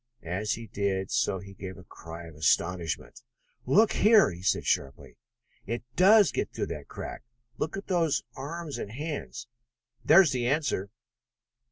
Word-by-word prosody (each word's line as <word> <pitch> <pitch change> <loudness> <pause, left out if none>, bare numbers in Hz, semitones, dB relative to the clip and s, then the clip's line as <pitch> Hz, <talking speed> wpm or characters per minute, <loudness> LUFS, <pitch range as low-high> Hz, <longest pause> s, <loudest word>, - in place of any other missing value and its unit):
As 95 +5 -1
he 115 - -6
did 100 -2 -2
so 115 -4 +1
he 100 +1 -10
gave 95 -1 -8
a 95 - -12
cry 85 0 -10
of 80 - -11
astonishment. 85 +2 -1 0.5
"Look 210 - +5
here!" 215 - +5
he 85 0 -9
said 90 - +1
sharply. 70 -1 -2 0.5
"It 115 +3 -3
does 200 0 +6
get - - -2
through - - -3
that - - -9
crack! - - -7 0.4
Look 160 +5 -2
at 195 - -6
those 170 -5 +1
arms 150 +2 -6
and - - -5
hands! 145 +1 -5 0.6
There 170 +5 +8
is 160 - 0
the 125 -2 -1
answer. 140 -8 0
115 Hz, 160 wpm, -28 LUFS, -, 0.6 s, There